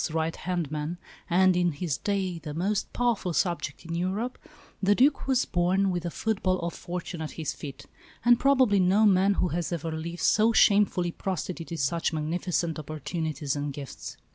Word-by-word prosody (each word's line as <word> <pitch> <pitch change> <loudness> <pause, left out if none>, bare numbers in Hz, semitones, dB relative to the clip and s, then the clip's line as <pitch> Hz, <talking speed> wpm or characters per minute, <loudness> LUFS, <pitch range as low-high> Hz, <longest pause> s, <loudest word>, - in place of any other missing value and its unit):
's - - -1
right 160 +1 -1
hand 175 -4 -2
man, 155 +3 -3 0.3
and, 185 +1 +4
in 175 -2 +2
his 150 -1 -2
day, 190 -4 -1
the 150 -1 -7
most 195 +5 -1
powerful 235 -7 0
subject 170 -3 -1
in 165 - -5
Europe, 190 +8 -2 0.4
the 205 +1 +4
Duc 275 +5 +3
was 260 -2 +2
born 185 +2 +1
with 175 -1 -1
the 170 - -3
football 190 -1 0
of 170 0 -3
fortune 175 -1 -6
at 155 - -5
his 160 -3 -2
feet; 140 -3 -9 0.4
and 240 0 +6
probably 260 -7 +4
no 190 +4 +4
man 195 0 +4
who 180 - +1
has 170 +1 -2
ever 165 -1 -3
lived 165 +2 -5
so 220 +1 +4
shamefully 200 -5 +4
prostituted 175 -2 -4
such 165 +4 0
magnificent 165 +1 -1
opportunities 155 -1 -3
and 145 0 -3
gifts. 140 -1 -8
175 Hz, 175 wpm, -27 LUFS, 160-195 Hz, 0.4 s, and